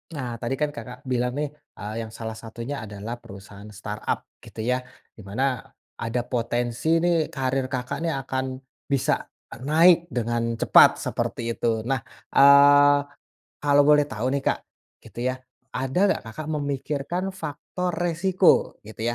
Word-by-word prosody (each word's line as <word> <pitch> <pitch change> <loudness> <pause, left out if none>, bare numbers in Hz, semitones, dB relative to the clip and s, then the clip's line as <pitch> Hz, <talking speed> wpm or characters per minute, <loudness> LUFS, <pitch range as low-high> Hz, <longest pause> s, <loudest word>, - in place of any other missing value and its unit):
Nah 130 -3 -4
tadi 120 +3 -1
kan 150 - +2
Kakak 125 +2 -8
bilang 125 0 +1
nih, 150 - 0 0.3
eee, 105 +1 -5
yang 110 - -9
salah 110 -1 -5
satunya 115 +5 -6
adalah 105 +3 -6
perusahaan 100 +1 -11
startup 105 +1 -4 0.2
gitu - - -12
ya 125 - +2 0.4
di 110 - -12
mana 125 +6 -1 0.4
ada 120 +1 -1
potensi 120 +2 -2 0.2
nih 170 -3 +2
karier 135 -1 -1
Kakak 125 -1 -3
nih 165 - 0
akan 130 0 -2 0.5
bisa 135 -2 +2 0.5
naik 170 +4 +5
dengan 115 -1 -1
cepat - - +7
seperti - - -3
itu. - - -1 0.2
Nah, 135 -1 +1 0.4
eee, 145 +1 +7 0.6
kalau 145 0 +5
boleh 150 -1 +6
tahu 120 -4 -4
nih 140 - -2
Kak - - +1 0.5
gitu - - -13
ya, - - -5 0.4
ada 130 +5 -2
nggak - - 0
Kakak 150 +7 -7
memikirkan 145 +5 -2
faktor 180 +1 -4
resiko? 175 +2 +2
Gitu 110 +1 -11
130 Hz, 145 wpm, -25 LUFS, 115-145 Hz, 0.6 s, cepat